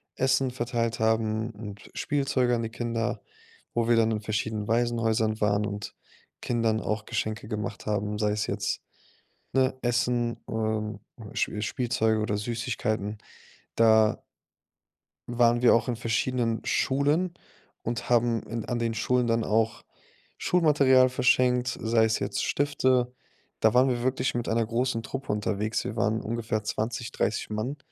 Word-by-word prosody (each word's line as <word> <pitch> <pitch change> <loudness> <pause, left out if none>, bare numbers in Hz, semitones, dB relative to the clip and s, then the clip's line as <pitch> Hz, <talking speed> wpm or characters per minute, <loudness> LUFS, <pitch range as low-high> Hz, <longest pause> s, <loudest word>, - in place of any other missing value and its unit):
Essen 130 0 +2
verteilt 120 -2 -2
haben 110 0 +1
und 105 -2 -10
Spielzeuge 135 -4 +1
an 115 - -2
die 110 - -3
Kinder. 115 0 -2 0.5
Wo 115 0 +1
wir 120 - +5
dann 115 0 +4
in 110 -1 -1
verschiedenen 110 0 -2
Waisenhäusern 115 -2 +1
waren 105 0 +2
und 105 0 -5 0.5
Kindern 115 -2 0
auch 110 0 -2
Geschenke 110 -1 -3
gemacht 105 -1 -4
haben, 105 0 -1
sei 105 -1 +2
es 105 0 -1
jetzt, - - -2 0.7
ne, 130 0 +2
Essen, 120 -1 0
ähm, 110 -1 -2 0.3
Sch - - 0
Spielzeuge 110 -1 0
oder 105 -1 -1
Süßigkeiten. 110 -2 -2 0.6
Da 110 -1 +4 1.1
waren 120 0 +3
wir 125 - +6
auch 115 +2 +1
in 120 - 0
verschiedenen 115 0 0
Schulen 145 +7 +1 0.5
und 115 +1 -3
haben 120 -1 +3
in 115 -1 -5
an 120 - -2
den 115 -1 0
Schulen 125 +2 +1
dann 115 0 +2
auch 110 +1 0 0.5
Schulmaterial 140 -7 +4
verschenkt, 125 -1 +2
sei 110 0 +3
es 110 - +1
jetzt 100 0 -2
Stifte. 130 -3 +1 0.5
Da 110 +1 +4
waren 130 +2 +6
wir 120 -1 -1
wirklich 130 0 0
mit 120 -1 -2
einer 115 0 +2
großen 115 +1 -1
Truppe 135 +1 -4
unterwegs. 105 +1 -1
Wir 110 - -4
waren 110 +1 +1
ungefähr 110 -1 -2
20, 115 +2 -3
30 110 - -1
Mann, 120 +7 -2
115 Hz, 145 wpm, -27 LUFS, 110-125 Hz, 1.1 s, wir